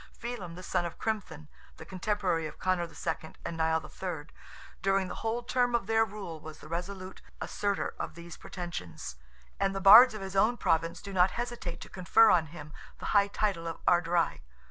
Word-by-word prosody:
Felim, 205 Hz, -8 st, -6 dB
the 185 Hz, -, -9 dB
son 175 Hz, -, 0 dB
of 170 Hz, -, -5 dB
Crimthan, 180 Hz, -9 st, -4 dB, 0.3 s
the 160 Hz, -, -10 dB
contemporary 185 Hz, -3 st, -1 dB
of -, -, -11 dB
Conor 185 Hz, -2 st, 0 dB
II. 165 Hz, -1 st, -5 dB
and 170 Hz, -, -3 dB
Nial 160 Hz, 0 st, +2 dB
III., 165 Hz, -5 st, -6 dB, 0.5 s
during 195 Hz, -1 st, +2 dB
the -, -, -4 dB
whole 230 Hz, +2 st, -1 dB
term 245 Hz, 0 st, +1 dB
of 235 Hz, -, 0 dB
their 225 Hz, +1 st, +3 dB
rule, 195 Hz, -7 st, -6 dB
was 155 Hz, 0 st, -10 dB
the -, -, -13 dB
resolute 185 Hz, +3 st, -5 dB, 0.2 s
assertor 200 Hz, -1 st, -1 dB
of -, -, -4 dB
these 170 Hz, 0 st, -9 dB
pretensions, 90 Hz, -, -7 dB, 0.4 s
and 195 Hz, 0 st, +1 dB
the -, -, -1 dB
Bards 220 Hz, +5 st, +9 dB
of 215 Hz, -, -6 dB
his 190 Hz, 0 st, -6 dB
own 220 Hz, +5 st, +3 dB
Province 165 Hz, -3 st, 0 dB
do 200 Hz, -, -7 dB
not 180 Hz, 0 st, +5 dB
hesitate 235 Hz, -8 st, -4 dB
to -, -, -8 dB
confer 205 Hz, +5 st, +5 dB
on 165 Hz, -3 st, +3 dB
him 150 Hz, -1 st, -10 dB, 0.2 s
the -, -, -8 dB
high 200 Hz, -1 st, +5 dB
title 200 Hz, -5 st, -1 dB
of 165 Hz, -, -4 dB
Ard 175 Hz, -1 st, +4 dB
Righ. 170 Hz, -, +1 dB
185 Hz, 190 wpm, -30 LUFS, 165-205 Hz, 0.5 s, Bards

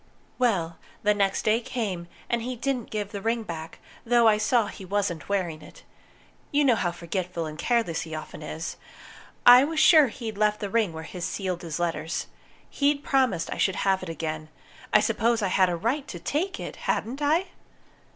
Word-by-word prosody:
Well, 175 Hz, -10 st, +1 dB, 0.2 s
the 210 Hz, 0 st, +4 dB
next 200 Hz, -1 st, +1 dB
day 220 Hz, +1 st, +4 dB
came, 205 Hz, -8 st, -4 dB, 0.2 s
and 235 Hz, -1 st, 0 dB
he 250 Hz, +2 st, -4 dB
didn't 250 Hz, 0 st, -2 dB
give 205 Hz, -2 st, -3 dB
the 200 Hz, -2 st, -5 dB
ring 230 Hz, +2 st, 0 dB
back, 165 Hz, -4 st, -7 dB, 0.3 s
though 235 Hz, 0 st, +4 dB
I 210 Hz, -1 st, +4 dB
saw 235 Hz, 0 st, +3 dB
he 200 Hz, -, -9 dB
wasn't 190 Hz, -3 st, -2 dB
wearing 175 Hz, -6 st, -1 dB
it. -, -, -14 dB, 0.7 s
You 290 Hz, 0 st, +3 dB
know 255 Hz, -, +5 dB
how 180 Hz, -5 st, 0 dB
forgetful 170 Hz, 0 st, -4 dB
and 155 Hz, -1 st, -6 dB
careless 200 Hz, 0 st, 0 dB
he 160 Hz, -1 st, -6 dB
often 155 Hz, 0 st, -8 dB
is! 155 Hz, +2 st, -5 dB, 0.7 s
I 245 Hz, +2 st, +10 dB
was 310 Hz, +2 st, -1 dB
sure 310 Hz, -3 st, +7 dB
he'd 220 Hz, -3 st, -6 dB
left 210 Hz, 0 st, +2 dB
the 200 Hz, -2 st, -4 dB
ring 225 Hz, -6 st, +2 dB
where 160 Hz, 0 st, -7 dB
he 180 Hz, +3 st, -8 dB
sealed 180 Hz, 0 st, -3 dB
his 165 Hz, -4 st, -4 dB
letters. 170 Hz, -1 st, -2 dB, 0.4 s
He'd 285 Hz, 0 st, +1 dB
promised 255 Hz, -12 st, +1 dB
I -, -, -7 dB
should 190 Hz, -, +2 dB
have 190 Hz, -1 st, +2 dB
it 185 Hz, -, -6 dB
again. 155 Hz, -1 st, -4 dB, 0.4 s
I -, -, +6 dB
suppose 230 Hz, -1 st, +1 dB
I 195 Hz, -, +1 dB
had 185 Hz, 0 st, +3 dB
a 175 Hz, -, 0 dB
right 255 Hz, -, -1 dB
to 175 Hz, -, -6 dB
take 320 Hz, -, -2 dB
it, -, -, -6 dB
hadn't 260 Hz, +6 st, -2 dB
I?" 320 Hz, +6 st, +2 dB
205 Hz, 190 wpm, -26 LUFS, 170-240 Hz, 0.7 s, I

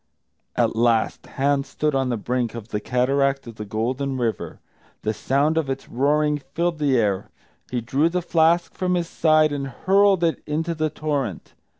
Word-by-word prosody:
At -, -, +1 dB
last 115 Hz, -1 st, +1 dB
Hans 140 Hz, 0 st, 0 dB
stood 150 Hz, -1 st, -1 dB
on 135 Hz, -1 st, +1 dB
the 120 Hz, -, 0 dB
brink 120 Hz, +1 st, -2 dB
of 115 Hz, -1 st, -8 dB
the 105 Hz, -, -2 dB
cataract 135 Hz, +4 st, +1 dB
of 115 Hz, -2 st, -10 dB
the 105 Hz, -, -5 dB
Golden 125 Hz, +6 st, -2 dB
River. 115 Hz, -3 st, -3 dB, 0.4 s
The 110 Hz, -, 0 dB
sound 145 Hz, +8 st, +1 dB
of 150 Hz, -4 st, -3 dB
its 135 Hz, 0 st, -4 dB
roaring 150 Hz, +3 st, +1 dB, 0.2 s
filled 170 Hz, -1 st, 0 dB
the 140 Hz, -4 st, +2 dB
air. 100 Hz, -4 st, 0 dB, 0.4 s
He 125 Hz, -1 st, -2 dB
drew 135 Hz, +8 st, +1 dB
the 180 Hz, +1 st, -2 dB
flask 170 Hz, 0 st, +2 dB
from 180 Hz, -1 st, 0 dB
his 175 Hz, -1 st, -1 dB
side 155 Hz, -2 st, +3 dB
and 140 Hz, -1 st, -3 dB
hurled 195 Hz, +6 st, +3 dB
it 165 Hz, -1 st, +1 dB
into 160 Hz, +3 st, -1 dB
the 155 Hz, -1 st, -1 dB
torrent. 145 Hz, -, -3 dB
140 Hz, 180 wpm, -23 LUFS, 120-155 Hz, 0.4 s, side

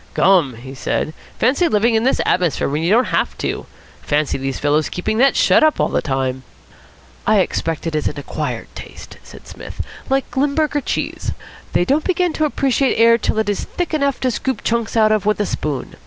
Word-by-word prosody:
"Gum!" 170 Hz, -9 st, +3 dB
he 130 Hz, +4 st, -10 dB
said. 150 Hz, +3 st, -2 dB, 0.2 s
"Fancy 275 Hz, +9 st, +2 dB
living 225 Hz, -2 st, +2 dB
in 220 Hz, -, +3 dB
this 265 Hz, -, +2 dB
atmosphere 180 Hz, -4 st, +1 dB
when 145 Hz, +3 st, -1 dB
you 165 Hz, -, 0 dB
don't 235 Hz, +5 st, +3 dB
have -, -, 0 dB
to. -, -, -3 dB, 0.3 s
Fancy 150 Hz, 0 st, 0 dB
these 135 Hz, 0 st, -3 dB
fellows 150 Hz, +1 st, +1 dB
keeping 215 Hz, +5 st, -2 dB
that 270 Hz, 0 st, +4 dB
shut -, -, +4 dB, 0.2 s
all -, -, +2 dB
the -, -, 0 dB
time." 130 Hz, -2 st, -2 dB, 0.9 s
"I -, -, +4 dB
expect 165 Hz, -1 st, -1 dB
it 165 Hz, -, -2 dB
is 155 Hz, -1 st, 0 dB
an -, -, -4 dB
acquired 145 Hz, -, -5 dB
taste," -, -, -11 dB
said -, -, -14 dB
Psmith, -, -, -7 dB, 0.3 s
"like 270 Hz, 0 st, -1 dB
Limburger 290 Hz, +2 st, +1 dB
cheese. -, -, -3 dB, 0.4 s
They 175 Hz, -, +2 dB
don't 290 Hz, +7 st, +1 dB
begin 360 Hz, -2 st, +1 dB
to 310 Hz, -, +1 dB
appreciate 275 Hz, -2 st, +1 dB
air 230 Hz, +1 st, +5 dB
till 220 Hz, -, -1 dB
it 220 Hz, -1 st, +1 dB
is 205 Hz, -1 st, -1 dB
thick 355 Hz, -2 st, -4 dB
enough 280 Hz, -3 st, 0 dB
to 255 Hz, -, +1 dB
scoop 260 Hz, +3 st, -3 dB
chunks 230 Hz, 0 st, -1 dB
out 215 Hz, -1 st, +4 dB
of 210 Hz, -1 st, +1 dB
with 210 Hz, -, +2 dB
a 205 Hz, -, +1 dB
spoon. 145 Hz, -8 st, -4 dB
215 Hz, 200 wpm, -19 LUFS, -, 0.9 s, air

